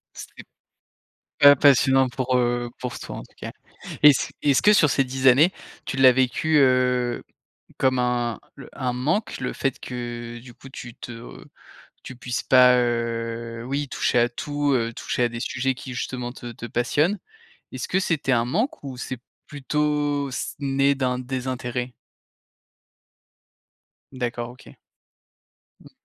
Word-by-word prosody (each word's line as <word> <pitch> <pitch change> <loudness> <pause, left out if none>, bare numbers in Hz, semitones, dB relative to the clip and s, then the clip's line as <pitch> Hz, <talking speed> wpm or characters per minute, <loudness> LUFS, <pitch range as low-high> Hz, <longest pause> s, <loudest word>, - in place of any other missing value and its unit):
C'est - - -9 1.1
pas 145 0 +9
passionnant 135 -1 +4
pour, 130 +1 -1
heu, 120 0 0
pour 125 -1 -5
toi, - - -7
en - - -6
tout - - -21
cas. - - -7 0.5
Est-ce 145 -3 +6
est-ce 140 -3 +3
que 210 - +6
sur 155 -7 +5
ces 135 +1 +2
10 130 0 -1
années, 145 +8 +6 0.3
tu 135 - -4
l'as 130 -1 +7
vécu, 130 +5 +1
heu, 125 -2 +2 0.6
comme 130 -1 +2
un 120 -2 0 0.2
l - - -10
un 125 -1 -2
manque, 145 - -1
le 125 - -3
fait 135 -2 -2
que, 120 -1 -6
du 125 -1 -13
coup, 135 - -14
tu 120 -3 -9
te 115 -1 -10 0.6
tu 130 - -9
puisses 125 0 -4
pas, 125 -1 +6
heu, 115 -1 -2
oui, 140 +2 -2
toucher 125 - 0
à 120 - +4
tout, 145 +3 -2
heu, 115 -2 0
toucher 125 - -1
à - - +2
des 120 0 -7
sujets 130 +1 -1
qui, 130 0 -8
justement, 125 0 -4
te 120 -2 -9
te 115 - -8
passionnent? 145 - 0 0.5
Est-ce - - -5
que 190 - +1
c'était 160 -7 -1
un 120 -1 +2
manque 210 - -2
ou 135 -3 -7
c'est 125 -1 -6 0.3
plutôt 145 0 -1
c - - -4
né 140 0 +2
d'un 125 -2 -1
désintérêt? 125 -1 -4 2.2
D'accord, 120 -2 -4
OK. 125 - -17 1.0
Mmh. - - -16
125 Hz, 150 wpm, -23 LUFS, 120-135 Hz, 2.2 s, pas